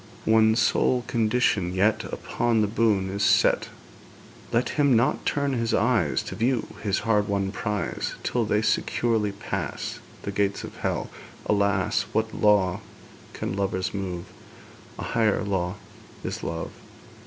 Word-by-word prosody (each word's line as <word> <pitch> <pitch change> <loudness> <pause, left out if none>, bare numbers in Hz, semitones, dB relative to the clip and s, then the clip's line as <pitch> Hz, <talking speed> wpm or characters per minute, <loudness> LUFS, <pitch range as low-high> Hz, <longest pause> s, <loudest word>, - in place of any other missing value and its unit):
One 110 0 +5
sole 125 +1 +2
condition 110 -6 +1
yet 110 +4 +2
Upon 120 -2 0
the 105 - +2
boon 105 -3 +1
is 100 +1 -3
set: - - +3 0.8
Let 120 +1 +1
him 145 -4 +3
not 120 +3 +1
turn 140 -1 0
his 115 -2 0
eyes 115 -10 +2
To - - -6
view 120 0 +1 0.2
his 100 -3 0
hard 105 -2 +2
won 100 -1 0
prize, 105 -1 -3
Till 120 - 0
they 105 0 +1
securely 110 -2 +1
pass 100 - -4 0.2
The 100 - -3
gates 100 0 0
of - - -9
Hell.' - - -2 0.3
Alas! 100 -2 +1
What 110 0 0
law 100 -4 +3 0.5
can - - -4
lovers 95 0 -1
move? 90 -3 -4 0.7
A - - -5
higher 110 -3 +1
law 95 -2 -1 0.5
is - - -4
love! 85 0 -4
105 Hz, 140 wpm, -25 LUFS, 100-115 Hz, 0.8 s, One